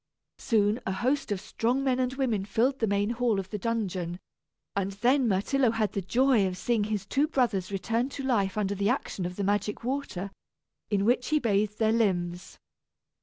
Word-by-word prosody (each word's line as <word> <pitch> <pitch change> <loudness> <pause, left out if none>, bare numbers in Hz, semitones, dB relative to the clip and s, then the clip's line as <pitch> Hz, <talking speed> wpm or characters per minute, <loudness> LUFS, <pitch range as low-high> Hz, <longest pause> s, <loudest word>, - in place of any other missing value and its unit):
Soon, 215 -1 +2
a - - 0
host 245 +6 0
of 200 - 0
strong 235 +6 -1
men 260 -2 +1
and 255 0 0
women 240 -7 0
filled 235 +7 +1
the 225 - +1
main 200 +2 +1
hall 235 -3 +1
of 190 0 -6
the 210 - -3
dungeon, 185 -6 -2 0.6
and 200 0 -1
then 245 +6 +2
Myrtillo 230 +6 +2
had 220 -2 0
the 200 - -2
joy 235 +1 +3
of 180 -1 -4
seeing 225 0 0
his 210 -2 -2
two 280 +8 +1
brothers 230 - 0
return 230 +6 -1
to 275 - -4
life 210 -7 +1
under 200 -1 0
the 200 +1 0
action 205 -8 -1
of 180 - -7
the 200 - -3
magic 205 +2 -1
water, 240 -7 -3 0.6
in 200 -1 +1
which 245 +2 +2
he 310 - +2
bathed 210 -5 +1
their 220 -1 +2
limbs. 180 -5 -1
215 Hz, 190 wpm, -28 LUFS, 195-245 Hz, 0.6 s, joy